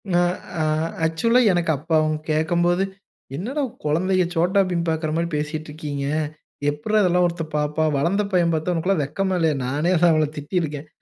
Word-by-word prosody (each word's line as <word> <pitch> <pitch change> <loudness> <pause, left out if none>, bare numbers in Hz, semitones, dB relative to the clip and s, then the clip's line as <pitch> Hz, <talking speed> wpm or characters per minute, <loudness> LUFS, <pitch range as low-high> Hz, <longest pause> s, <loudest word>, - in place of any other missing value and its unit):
நா 175 - +4 0.4
அ - - +1 0.4
ஆக்சுவலா 230 +10 +2
எனக்கு 175 -2 +1
அப்ப 150 +5 -17
அவங்க 155 0 +1
கேட்கும்போது, 175 +4 +2 0.5
"என்னடா 255 - -2 0.2
குழந்தைய 185 +5 +2
சோட்டா 180 +4 +3
பீம் 170 -1 -1
பாக்குற 160 -1 -1
மாரி 170 +1 0
பேசிட்டுருக்கீங்க. 150 -1 -4 0.6
எப்புட்ரா 180 +9 +1
இதெல்லாம் 180 -1 +3
ஒருத்தன் 165 -2 -5
பாப்பான்." 150 +1 0
வளந்த 180 +9 +1
பையன் 175 -2 +2
பாத்தா, 160 +3 0
"உனக்குலாம் 170 +1 +1
வெக்கமே 190 +7 -1
இல்லையா?" 160 -3 +2
நானே 150 +7 0 0.2
அவள 155 -1 +2
திட்டியிருக்கேன். 150 -1 -3
165 Hz, 145 wpm, -22 LUFS, 155-180 Hz, 0.6 s, நா